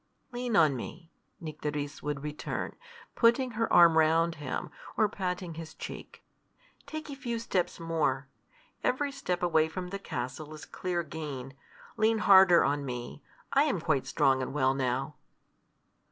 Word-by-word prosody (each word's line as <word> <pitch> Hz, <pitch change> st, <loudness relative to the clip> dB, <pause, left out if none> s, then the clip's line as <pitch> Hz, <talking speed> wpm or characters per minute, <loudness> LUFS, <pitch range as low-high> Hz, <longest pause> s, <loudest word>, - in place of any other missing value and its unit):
"Lean 245 Hz, -2 st, -2 dB
on 155 Hz, -7 st, +5 dB
me," 165 Hz, +7 st, -8 dB, 0.3 s
Nycteris 150 Hz, -2 st, -4 dB
would 145 Hz, -1 st, -3 dB
return, 150 Hz, 0 st, -4 dB, 0.4 s
putting 240 Hz, +2 st, +3 dB
her 230 Hz, 0 st, -1 dB
arm 170 Hz, -2 st, +7 dB
round 165 Hz, +2 st, +3 dB
him, 130 Hz, -, -4 dB, 0.3 s
or 215 Hz, -, +4 dB
patting 180 Hz, -3 st, -3 dB
his 160 Hz, 0 st, -8 dB
cheek. -, -, -9 dB, 0.6 s
"Take 310 Hz, 0 st, -6 dB
a -, -, -5 dB
few 245 Hz, -3 st, -3 dB
steps 185 Hz, -6 st, -1 dB
more. 155 Hz, -5 st, 0 dB, 0.6 s
Every 280 Hz, +3 st, +1 dB
step 180 Hz, -11 st, -3 dB
away 160 Hz, -2 st, +3 dB
from 180 Hz, +2 st, -5 dB
the 200 Hz, +1 st, -5 dB
castle 145 Hz, +1 st, -5 dB
is 155 Hz, -, -10 dB
clear 175 Hz, -2 st, -2 dB
gain. 140 Hz, -4 st, -6 dB, 0.4 s
Lean 220 Hz, +1 st, +3 dB
harder 190 Hz, -4 st, +7 dB
on 145 Hz, 0 st, 0 dB
me. 125 Hz, +1 st, -6 dB, 0.3 s
I 280 Hz, +2 st, +5 dB
am 265 Hz, -, 0 dB
quite 155 Hz, -4 st, 0 dB
strong 135 Hz, -1 st, +3 dB
and 130 Hz, +2 st, -4 dB
well 130 Hz, -2 st, +3 dB
now." 135 Hz, +2 st, -2 dB
165 Hz, 150 wpm, -30 LUFS, 145-200 Hz, 0.6 s, arm